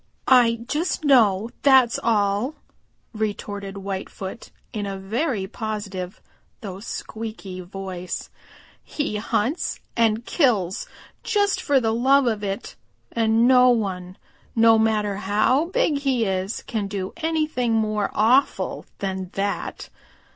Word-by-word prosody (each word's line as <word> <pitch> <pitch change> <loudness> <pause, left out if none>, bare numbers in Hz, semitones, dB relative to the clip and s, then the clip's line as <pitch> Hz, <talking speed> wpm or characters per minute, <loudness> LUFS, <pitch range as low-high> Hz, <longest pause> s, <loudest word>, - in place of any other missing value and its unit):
"I 235 -3 +5
just 310 +2 -1
know, 225 -5 +4
that's 265 -4 +5
all," 210 +5 +1 0.6
retorted 205 -2 -4
Whitefoot 195 +2 -6 0.2
in 205 -3 -3
a 195 -1 -4
very 215 +2 -1
positive 205 -3 -5 0.4
though 195 -3 -6
squeaky 215 -3 -6
voice. 185 -1 -6 0.5
"He 290 -8 -3
hunts 230 +8 -1 0.2
and 225 0 +2
kills 210 - +1 0.3
just 410 -2 +1
for 280 -2 +3
the 225 -3 0
love 265 +4 +4
of 220 -3 0
it, 200 +3 -4 0.4
and 225 +1 +3
no 255 -1 +6
one, 185 -6 -1 0.4
no 225 -1 +6
matter 210 -2 +1
how 215 - +2
big 340 -6 +1
he 265 -5 +1
is, 190 +1 -2
can 215 -3 -3
do 195 -1 -4
anything 310 -7 0
more 215 -2 +1
awful 245 +6 +2
than 190 -2 -3
that. 200 +1 -3
220 Hz, 120 wpm, -23 LUFS, 195-250 Hz, 0.6 s, no